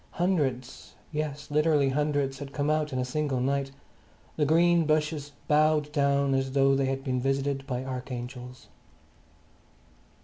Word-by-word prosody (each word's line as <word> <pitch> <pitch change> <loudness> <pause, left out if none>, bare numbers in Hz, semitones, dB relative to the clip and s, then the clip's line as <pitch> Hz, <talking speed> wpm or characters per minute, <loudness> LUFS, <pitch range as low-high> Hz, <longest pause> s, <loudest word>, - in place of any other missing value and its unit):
Hundreds, 145 -9 -2 0.2
yes, 150 -1 -4
literally 150 -2 +3
hundreds, 145 -1 0
had 140 -1 -7
come 145 +1 0
out 155 -1 0
in 130 - -3
a 125 - 0
single 140 0 -1
night; 135 +2 0 0.7
the 150 -2 +1
green 170 +1 +4
bushes 155 -1 0 0.2
bowed 150 0 +3
down 140 -1 +2
as 135 0 -1
though 135 0 +4
they 135 0 +1
had 135 0 -2
been 130 -2 -1
visited 135 +1 -1
by 125 0 -3
archangels. 125 -1 -7
140 Hz, 140 wpm, -27 LUFS, 135-150 Hz, 0.7 s, green